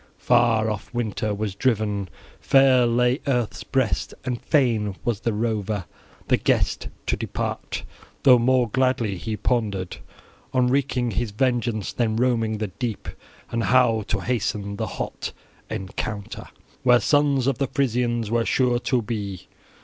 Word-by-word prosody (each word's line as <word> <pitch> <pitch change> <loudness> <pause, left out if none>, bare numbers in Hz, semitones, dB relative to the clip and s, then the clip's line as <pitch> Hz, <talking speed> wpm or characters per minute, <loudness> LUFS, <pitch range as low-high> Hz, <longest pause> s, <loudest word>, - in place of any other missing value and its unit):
Far 120 -2 +3
off 105 - -6
winter 110 -2 -1
was 105 -1 -2
driven; 105 -4 0 0.3
fair 130 -3 +5
lay 125 +3 +2
earth's 125 -5 0
breast; 130 -5 -1
and 125 -2 -2
fain 115 -8 +1
was 115 -4 0
the 115 - -1
rover, 105 -3 -1 0.4
the - - +4
guest, - - +1 0.2
to - - +1
depart, - - -4 0.4
though 125 -3 +7
more 125 +1 +3
gladly 125 -3 +1
he 105 +5 -4
pondered 100 -5 -1 0.6
on 125 -1 +3
wreaking 125 -2 +1
his 115 +3 -1
vengeance 120 -2 0
than 115 -3 0
roaming 115 -2 +1
the 105 -1 -3
deep, 110 +3 -4 0.4
and 115 -1 0
how 125 -3 +4
to 100 - -1
hasten 100 -3 -2
the - - -2
hot - - -5 0.4
encounter 100 +2 -5 0.3
where 125 -1 +5
sons 145 -3 +2
of 135 -2 0
the 135 - +1
Frisians 120 -4 0
were 115 0 +2
sure 125 0 +2
to 125 -1 0
be. 100 -5 -4
115 Hz, 140 wpm, -24 LUFS, 105-125 Hz, 0.6 s, though